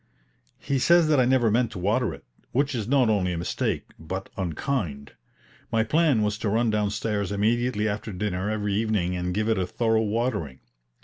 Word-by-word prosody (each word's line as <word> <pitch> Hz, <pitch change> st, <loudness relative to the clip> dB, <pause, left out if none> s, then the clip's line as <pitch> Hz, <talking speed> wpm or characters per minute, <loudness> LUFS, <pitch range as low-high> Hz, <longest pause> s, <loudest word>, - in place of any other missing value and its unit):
He 140 Hz, -1 st, -1 dB
says 170 Hz, +4 st, +5 dB
that 150 Hz, -3 st, +4 dB
I 125 Hz, -, +4 dB
never 125 Hz, -3 st, +3 dB
meant 120 Hz, +1 st, +2 dB
to -, -, -7 dB
water 105 Hz, +4 st, +1 dB
it, -, -, -10 dB, 0.3 s
which 140 Hz, +2 st, +1 dB
is 110 Hz, -4 st, -3 dB
not 130 Hz, -1 st, +3 dB
only 95 Hz, -5 st, +1 dB
a -, -, -3 dB
mistake, 85 Hz, -, -2 dB
but 95 Hz, +5 st, -5 dB
unkind. 85 Hz, -, -3 dB, 0.6 s
My 110 Hz, 0 st, +2 dB
plan 145 Hz, -2 st, +2 dB
was 105 Hz, 0 st, -1 dB
to 105 Hz, -, -1 dB
run 115 Hz, +2 st, +2 dB
downstairs 105 Hz, -1 st, -1 dB
immediately 110 Hz, +2 st, +1 dB
after 110 Hz, +1 st, -3 dB
dinner 95 Hz, 0 st, -2 dB
every 105 Hz, -2 st, -1 dB
evening 105 Hz, -4 st, 0 dB
and 90 Hz, 0 st, -2 dB
give 105 Hz, +4 st, -1 dB
it 110 Hz, -3 st, +1 dB
a 90 Hz, -, -1 dB
thorough 110 Hz, +2 st, +1 dB
watering. 105 Hz, -, -2 dB
110 Hz, 185 wpm, -25 LUFS, 95-120 Hz, 0.6 s, says